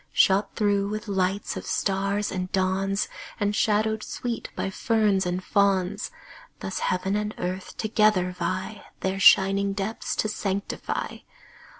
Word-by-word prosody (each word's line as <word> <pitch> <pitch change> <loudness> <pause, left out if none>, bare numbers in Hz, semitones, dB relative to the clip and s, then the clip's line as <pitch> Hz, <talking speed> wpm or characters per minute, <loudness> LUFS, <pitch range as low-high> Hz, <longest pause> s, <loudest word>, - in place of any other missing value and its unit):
Shot 200 +1 +3
through 200 -2 +1
with 215 +1 -4
lights 195 0 0
of - - -5
stars 200 +1 0
and 185 -1 -3
dawns, 195 +1 +1 0.3
And 205 0 +1
shadowed 220 +1 +2
sweet 235 +1 -4
by 195 - -2
ferns 205 -3 +2
and 180 +1 -2
fawns, 200 0 +1 0.5
Thus - - -4
heaven 190 +2 0
and 210 0 -2
earth 185 +1 -4
together 215 -4 +2
vie 185 +4 -3 0.2
Their 190 +1 -1
shining 195 +1 +5
depths 200 +3 -3
to - - 0
sanctify. 200 -2 -3
200 Hz, 130 wpm, -26 LUFS, 190-210 Hz, 0.5 s, shining